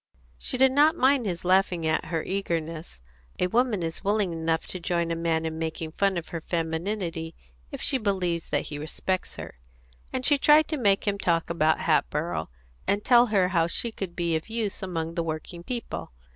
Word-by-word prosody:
She 255 - -2
did 265 +1 +5
not 295 +3 +5
mind 260 -3 +3
his 175 -2 -3
laughing 185 -2 +3
at 160 0 +1
her 165 -1 -2
eagerness 165 - -3 0.3
(a - - +1
woman 225 -1 +1
is 165 0 -4
willing 205 -3 +1
enough 165 0 -1
to 185 - -5
join 170 -1 -1
a - - 0
man 165 -1 0
in 160 0 -3
making 160 0 -3
fun 195 +2 +1
of 170 - -5
her 165 - -4
femininity 165 0 -3 0.3
if - - -7
she 265 - +2
believes 185 -6 -1
that - - 0
he 145 - -6
respects 185 +4 -3
her), - - -9 0.5
and 255 0 -2
she 290 -1 +5
tried 300 +2 +6
to 310 - -1
make 200 -5 +2
him 200 0 0
talk 170 -2 +1
about 160 -1 +2
Hatboro', 155 - 0 0.4
and 205 +1 +1
tell 245 -1 +6
her 195 -4 +2
how 170 -3 +2
she 230 +7 -1
could 190 -5 -6
be 170 -2 0
of 160 +7 -3
use 220 -3 -2
among 165 -3 -3
the 170 -1 -1
working 165 +2 -5
people. 240 +4 -5
175 Hz, 195 wpm, -26 LUFS, 165-205 Hz, 0.5 s, tried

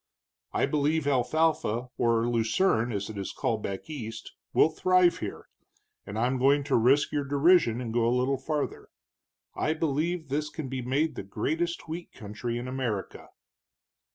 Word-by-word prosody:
I - - +1
believe 150 +1 +1
alfalfa, 135 -3 +1
or 115 -1 +2
lucerne, 120 +2 +2
as 100 -2 -3
it 105 - -7
is 95 - -4
called 110 -2 -1
back 95 -1 -5
East, 115 -7 -7 0.2
will - - +5
thrive 185 +2 +3
here, - - -6 0.6
and 100 - -5
I'm 125 +3 +1
going 140 +2 +4
to 140 -1 0
risk 130 +6 +4
your 145 -1 0
derision 140 -3 +4
and 115 -3 -4
go 115 -1 +2
a - - +3
little 130 +2 +1
farther. 150 -2 -3 0.7
I 155 - 0
believe 160 +1 -1
this 150 +2 -1
can 150 -4 -6
be 130 0 -3
made 145 +6 0
the - - -5
greatest 160 - -2
wheat 165 +2 -6
country 110 +3 -5
in 120 +1 -5
America." 125 -6 -4
135 Hz, 160 wpm, -28 LUFS, 115-155 Hz, 0.7 s, will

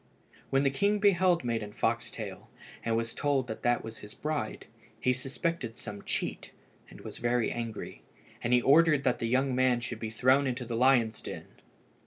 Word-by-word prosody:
When 135 +1 +2
the 135 - +3
king 200 +9 +2
beheld 185 -5 +3
Maiden 115 -3 -2
Foxtail, - - -3 0.3
and 115 0 +1
was 115 0 -2
told 140 -3 +1
that 110 -2 -6
that 120 0 +1
was 115 0 -7
his 105 - -12
bride, 150 -1 -3 0.3
he 125 - +2
suspected 135 -1 -3
some 100 -2 -8
cheat, - - -3 0.4
and - - -13
was - - -8
very 120 0 +1
angry, 115 -2 -5 0.4
and 120 - 0
he 125 -1 +4
ordered 150 0 +5
that 125 - +1
the 115 - -1
young 130 +2 +2
man 130 -1 +3
should 120 -2 -5
be 110 - -4
thrown 130 +5 +3
into 125 -1 -3
the 115 0 -4
lions' 120 -3 +3
den. - - -7
125 Hz, 180 wpm, -30 LUFS, 115-140 Hz, 0.4 s, ordered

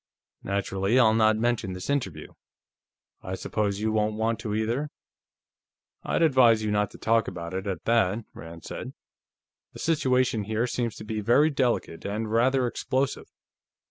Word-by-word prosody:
"Naturally, 100 +3 0
I'll 115 -4 +5
not 110 -1 +4
mention 115 -4 0
this 90 0 -6
interview. 95 - -3 0.9
I 95 - -5
suppose 100 +1 -2
you 110 0 0
won't 105 0 0
want 110 +1 -1
to, 105 -2 -3
either?" 120 +7 -1 1.1
"I'd - - 0
advise 125 -7 +5
you 105 - -1
not 105 0 +1
to - - -13
talk 115 0 +2
about 85 0 -6
it, 95 +2 -4
at 95 -4 -4
that," 115 -2 +2
Rand 80 0 -10
said. - - -7 0.8
"The - - -11
situation 130 -8 +1
here 110 +3 0
seems 120 -2 -2
to - - -9
be 110 0 -3
very 140 +9 +4
delicate, 125 - -1
and 105 +2 -3
rather 125 +3 +3
explosive.... 130 +2 -2
110 Hz, 155 wpm, -26 LUFS, 100-120 Hz, 1.1 s, I'll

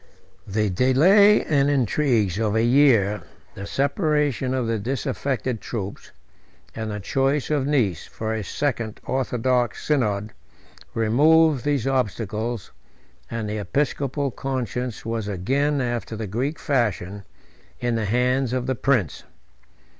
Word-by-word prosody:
The 105 0 0
delay 180 - +5
and 140 -2 +2
intrigues 120 - +1
of 110 -1 0
a 110 - +3
year, 120 -5 +4 0.3
the 100 +1 -7
separation 145 - 0
of 130 -2 0
the 115 -1 -1
disaffected 125 0 -2
troops, 100 -4 -6 0.7
and 110 0 -4
the 105 0 -4
choice 135 +8 0
of 140 -3 +1
Nice 115 - 0
for 110 0 -4
a 110 -1 -3
second 115 -2 -2
orthodox 125 -2 0
synod, 110 -7 0 0.6
removed 145 +5 +4
these 145 -5 0
obstacles; 115 -3 -2 0.6
and 115 -2 -3
the 105 +1 -3
episcopal 140 - -1
conscience 125 -2 -4
was 115 -2 -3
again, 135 +10 0
after 120 -2 -3
the 110 0 -4
Greek 125 - -2
fashion, 105 - -1 0.6
in 120 -1 -1
the 115 -2 -1
hands 125 +3 +1
of 130 -1 -1
the 130 - 0
prince. 120 - 0
120 Hz, 125 wpm, -23 LUFS, 110-140 Hz, 0.7 s, delay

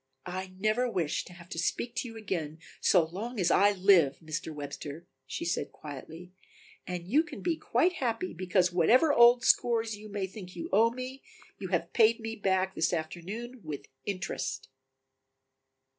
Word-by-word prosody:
"I 185 +1 -5
never 215 +5 +1
wish 170 -9 -1
to 180 - -12
have 175 -1 -13
to 165 - -4
speak 230 +7 -1
to 255 - -1
you 225 -1 -9
again 165 -8 -3 0.2
so 175 -4 +4
long 210 +8 -6
as 175 -2 +2
I 205 +1 +5
live, 180 -8 +4
Mr. 160 0 -5
Webster," 145 +2 -7 0.2
she - - -4
said 170 - -1
quietly, 160 +5 -9 0.6
"And 175 -1 -5
you 280 +10 +4
can 335 - -8
be 345 -2 +1
quite 355 +3 +1
happy, 230 - -2
because 185 0 +1
whatever 245 - +5
old 240 0 +7
scores 230 -3 +3
you 210 +1 -11
may 200 -2 -2
think 190 -2 -10
you 170 - -5
owe 225 +3 +6
me, 255 +2 -7 0.4
you - - -4
have - - -1
paid 230 -1 +5
me 225 0 -5
back 190 -2 +1
this 165 +2 +1
afternoon 195 +10 -5
with 150 -3 -6 0.2
interest." 180 -9 -4
190 Hz, 170 wpm, -30 LUFS, 170-230 Hz, 0.6 s, old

